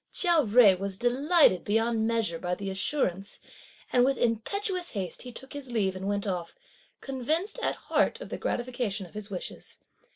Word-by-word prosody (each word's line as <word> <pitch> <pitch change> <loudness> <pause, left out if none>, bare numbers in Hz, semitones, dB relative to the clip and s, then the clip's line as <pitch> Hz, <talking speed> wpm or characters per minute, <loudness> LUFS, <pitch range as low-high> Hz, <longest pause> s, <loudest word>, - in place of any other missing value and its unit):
Chia 345 -4 +3
Jui 210 -6 +6
was 195 -1 -4
delighted 255 - +4
beyond 225 +1 +1
measure 225 -8 0
by 180 +1 -2
the 195 +1 -4
assurance, 195 -2 -1 0.5
and 245 - +5
with 270 0 +2
impetuous 355 - -1
haste, 190 -5 -4
he 250 - -7
took 265 +3 -10
his 285 -3 -8
leave 195 -5 0
and 190 +1 -5
went 200 0 -1
off; 180 -4 -3 0.5
convinced 310 - -2
at - - 0
heart - - 0
of - - -8
the - - -4
gratification 240 -5 -2
of 175 - -16
his 210 0 -6
wishes. 185 -3 -6
225 Hz, 170 wpm, -28 LUFS, 195-265 Hz, 0.5 s, Jui